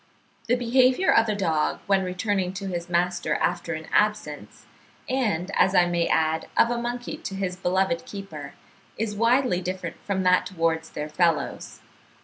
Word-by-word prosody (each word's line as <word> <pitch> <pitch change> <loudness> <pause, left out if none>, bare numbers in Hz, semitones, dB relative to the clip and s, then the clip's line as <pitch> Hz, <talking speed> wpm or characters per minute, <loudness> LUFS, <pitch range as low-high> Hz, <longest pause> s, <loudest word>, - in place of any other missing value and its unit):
The 245 - +3
behaviour 255 +7 +3
of 225 -1 +4
a 210 - 0
dog 160 -6 0
when 195 -1 +2
returning 185 0 -1
to 195 +1 -6
his 175 -2 -4
master 175 0 0
after 175 -1 -1
an 160 0 -7
absence, 210 -8 -1 0.4
and, 210 -9 -1
as 190 - +3
I 175 - +6
may 175 -1 0
add, 160 0 +1
of 230 - +5
a 235 0 -1
monkey 245 +4 -4
to 305 -12 -6
his 190 -2 -2
beloved 185 -1 0
keeper, 160 -9 -8 0.4
is 210 -1 -2
widely 230 -3 +2
different 180 -2 -5
from 190 -2 -1
that 180 0 +3
towards 165 -3 -1
their 150 - -5
fellows. 155 -3 -1
185 Hz, 160 wpm, -25 LUFS, 170-215 Hz, 0.4 s, I